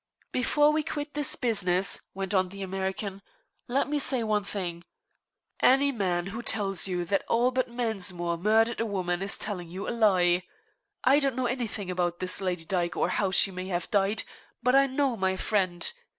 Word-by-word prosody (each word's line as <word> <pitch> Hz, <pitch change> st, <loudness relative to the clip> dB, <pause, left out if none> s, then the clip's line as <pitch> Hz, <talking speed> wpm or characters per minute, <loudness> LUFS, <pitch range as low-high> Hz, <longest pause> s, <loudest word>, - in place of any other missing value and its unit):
"Before 295 Hz, +4 st, +3 dB
we 310 Hz, +1 st, +1 dB
quit 295 Hz, 0 st, -5 dB
this 295 Hz, -2 st, +4 dB
business," 195 Hz, -6 st, +2 dB
went 195 Hz, 0 st, -3 dB
on 185 Hz, -2 st, +2 dB
the 195 Hz, +1 st, -7 dB
American, 190 Hz, +1 st, -4 dB, 0.5 s
"let 260 Hz, +3 st, 0 dB
me 295 Hz, 0 st, -1 dB
say 260 Hz, -3 st, +3 dB
one 210 Hz, -2 st, 0 dB
thing. 175 Hz, -4 st, -5 dB, 0.8 s
Any 275 Hz, +2 st, +4 dB
man 180 Hz, -7 st, -1 dB
who 230 Hz, -, -4 dB
tells 195 Hz, -5 st, 0 dB
you 180 Hz, -2 st, -2 dB
that 195 Hz, +2 st, 0 dB
Albert 250 Hz, +2 st, +2 dB
Mensmore 195 Hz, -8 st, -2 dB
murdered 220 Hz, +6 st, +2 dB
a -, -, 0 dB
woman 185 Hz, -3 st, -2 dB
is 195 Hz, +1 st, -1 dB
telling 180 Hz, -5 st, -5 dB
you 185 Hz, +3 st, -6 dB
a -, -, -1 dB
lie. 185 Hz, -6 st, +3 dB, 0.6 s
I 270 Hz, +3 st, +5 dB
don't 275 Hz, -3 st, 0 dB
know 255 Hz, 0 st, -1 dB
anything 230 Hz, -6 st, -3 dB
about 175 Hz, -1 st, -1 dB
this 185 Hz, +1 st, +1 dB
Lady 180 Hz, -3 st, -2 dB
Dyke, 175 Hz, -1 st, -1 dB
or -, -, +1 dB
how 195 Hz, +1 st, 0 dB
she 190 Hz, +1 st, +4 dB
may 185 Hz, 0 st, -6 dB
have 175 Hz, -3 st, -3 dB
died, 200 Hz, +1 st, +1 dB, 0.4 s
but 250 Hz, 0 st, +3 dB
I 275 Hz, 0 st, +5 dB
do 260 Hz, -, -10 dB
know 275 Hz, -3 st, +1 dB
my 190 Hz, -1 st, 0 dB
friend. 185 Hz, -, 0 dB
200 Hz, 185 wpm, -27 LUFS, 185-245 Hz, 0.8 s, I